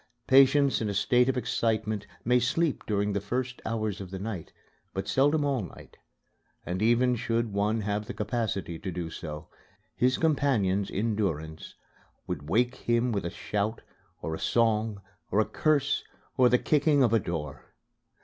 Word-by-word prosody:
Patients 135 0 +5
in 110 - -1
a 100 - -3
state 120 +5 +3
of 130 - 0
excitement 110 -4 -1 0.2
may 125 +2 +4
sleep 150 +5 0
during 105 -1 0
the 100 - -1
first 125 +4 -3
hours 110 -3 -2
of 95 - -7
the 95 - -6
night, 100 -3 -5 0.4
but 95 0 -3
seldom 145 +2 +3
all 135 -4 0
night; 90 - -11 0.7
and 90 +2 -3
even 120 +3 +3
should 115 -2 -1
one 105 +2 +1
have 105 +1 -2
the - - -5
capacity 105 -6 -2
to 95 - -4
do 85 -2 -4
so, 75 -2 -7 0.5
his 125 +1 +2
companions 125 - +1
in 110 +2 -1
durance 80 -6 -3 0.5
would 70 +2 -5
wake 120 +6 +2
him 120 0 +1
with 100 -5 -2
a - - -1
shout 105 +4 -3 0.4
or 80 - -3
a - - -4
song 110 -3 +1 0.3
or 105 - +2
a 110 - +4
curse 155 -3 +1 0.3
or 125 -1 +5
the 125 - +5
kicking 145 0 +3
of 115 -2 +3
a 115 - +5
door. 80 -6 -5
110 Hz, 170 wpm, -28 LUFS, 100-125 Hz, 0.7 s, Patients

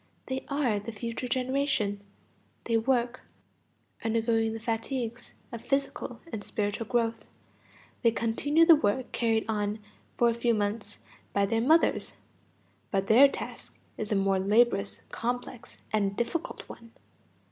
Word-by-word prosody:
They 260 0 -3
are 270 -7 +1
the 210 +3 -6
future 230 +3 -4
generation. 255 -5 0 0.6
They 230 - 0
work, 245 +1 +1 0.8
undergoing 225 0 +1
the 225 - -5
fatigues 230 +1 -4 0.2
of 235 -2 -6
physical 275 -3 -2
and 205 - -4
spiritual 205 +2 -2
growth. 230 -1 0 0.7
They 235 - +5
continue 260 +8 +2
the 330 -1 +9
work 260 -2 0
carried 225 -2 +1
on 210 -1 -1 0.4
for 240 - +4
a 235 - +3
few 235 0 +1
months 205 0 -2 0.4
by 200 0 +3
their 225 +3 0
mothers, 315 +7 +3 0.7
but 195 -2 0
their 240 +7 +8
task - - -8 0.2
is 215 0 -5
a - - +3
more 195 -1 +2
laborious, 205 0 +2
complex, 245 0 -4 0.2
and 200 -2 +1
difficult 310 +8 -3
one. 230 -1 -12
230 Hz, 135 wpm, -29 LUFS, 210-250 Hz, 0.8 s, the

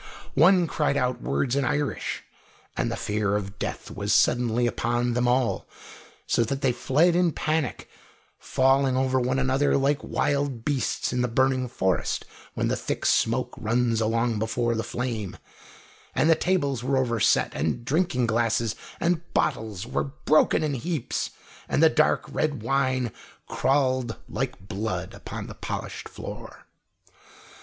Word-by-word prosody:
One 175 +5 +5
cried 150 -3 0
out 125 -1 0
words 130 -2 0
in 140 - +1
Irish, 145 0 -1 0.5
and - - -1
the - - -1
fear 105 -1 -1
of 100 -1 -4
death - - -4
was - - -3
suddenly 120 0 +3
upon 120 +1 0
them 125 +1 +1
all, 125 0 +1 0.6
so 115 - +2
that 135 +4 -3
they 135 - +3
fled 150 +8 +2
in 175 -2 +3
panic, 155 -4 -1 0.5
falling 135 0 +2
over 130 0 +2
one 130 +1 0
another 135 +2 +2
like 140 +2 +1
wild 140 -5 -1
beasts 140 -3 -1
in 125 - +1
the 125 - +2
burning 130 +2 +1
forest, 95 -7 -1 0.3
when - - 0
the - - +1
thick - - -3
smoke 115 +3 +2
runs 115 0 +1
along 115 0 +1
before 120 +2 0
the 115 0 -1
flame; 115 -6 -4 0.8
and 160 - +4
the - - +9
tables 145 -8 0
were 135 +1 +1
over 120 -3 +1
set, - - +3
and 120 - -2
drinking 140 -3 +1
glasses 115 -1 +1 0.2
and 170 -1 +1
bottles 110 -3 0
were 120 - -1
broken 155 +2 +2
in 150 -2 0
heaps, 155 +1 -2 0.4
and - - +2
the - - +8
dark - - +2
red 145 -7 -2
wine 130 -1 +1 0.4
crawled 130 -4 +1
like 125 -5 -4
blood 100 -3 -3
upon - - -7
the - - -8
polished - - -5
floor. - - -9
130 Hz, 150 wpm, -26 LUFS, 115-140 Hz, 0.8 s, the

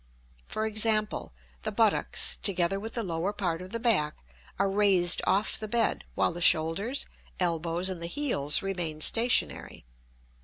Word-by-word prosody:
For 215 - -3
example, 215 -1 0 0.3
the - - -4
buttocks, - - +2
together 190 0 +1
with 225 +3 -7
the 230 - -1
lower 170 +1 -2
part 180 -5 -3
of 185 - -9
the 230 +3 -5
back, 200 -11 +2 0.4
are 195 - +1
raised 195 -3 +3
off 200 +3 0
the 215 - -5
bed, 230 +1 0
while - - +1
the 175 - -8
shoulders, 175 - +2 0.3
elbows, 170 0 -1
and 185 -3 -4
the 170 - -2
heels 175 - 0
remain 175 -5 -4
stationary. 230 - +2
195 Hz, 150 wpm, -27 LUFS, 170-215 Hz, 0.4 s, raised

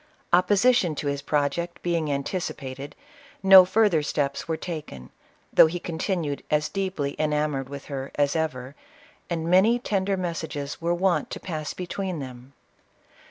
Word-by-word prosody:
Opposition 190 0 +4
to 145 - -5
his 140 0 -1
project 150 +4 -1
being 165 -4 0
anticipated, 140 -2 -4 0.5
no 190 -1 +10
further 200 -4 +3
steps 145 0 -2
were 160 -1 -1
taken, 150 - -7 0.4
though - - +8
he 175 +2 -4
continued 165 -3 -2
as 150 0 +1
deep 195 -1 -3
ly 140 0 -1
enamored 150 -3 0
with 140 0 -8
her 135 -2 -5
as 145 0 +1
ever, 140 -5 -2 0.6
and 165 -2 -2
many 190 +7 +5
tender 195 -4 -1
mes 175 -3 -2
sages 145 -2 -5
were 170 +1 +1
wont 175 -4 +1
to - - -6
pass 155 -4 -5
between 185 0 -4
them. 130 -1 -9
160 Hz, 150 wpm, -25 LUFS, 140-180 Hz, 0.6 s, no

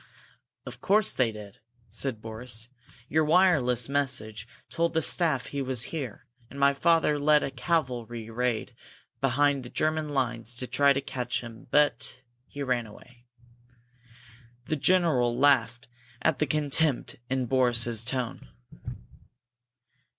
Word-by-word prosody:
"Of - - -9
course 210 +1 +2
they 125 -3 +1
did!" 105 -2 -11 0.3
said 115 0 -4
Boris. 110 +1 -5 0.4
"Your 155 +3 +2
wireless 150 -8 +3
message 130 -6 -2 0.2
told 170 0 -1
the 160 - +3
staff 150 -8 +2
he 140 - -4
was 130 -3 -1
here, 135 -9 -5 0.2
and 140 - -10
my 140 0 +4
father 160 0 +2
led 150 +1 +4
a 135 - -3
cavalry 125 -6 -2
raid 120 -1 -2 0.5
behind 140 +1 +2
the 120 - -9
German 155 +1 -1
lines 120 -4 -2
to 125 - -3
try 140 +2 +3
to 140 0 +1
catch 125 -2 -3
him. 115 -1 -11
But 145 -3 +2 0.3
he 145 - -6
ran 125 -4 -1
away!" 120 +3 -17 1.4
The 155 - -1
general 145 -8 +2
laughed 125 -3 +2 0.4
at 140 - +2
the 150 - +1
contempt 150 -1 0
in 130 -1 0
Boris's 120 -3 +2
tone. 125 - -3
130 Hz, 130 wpm, -27 LUFS, 120-145 Hz, 1.4 s, my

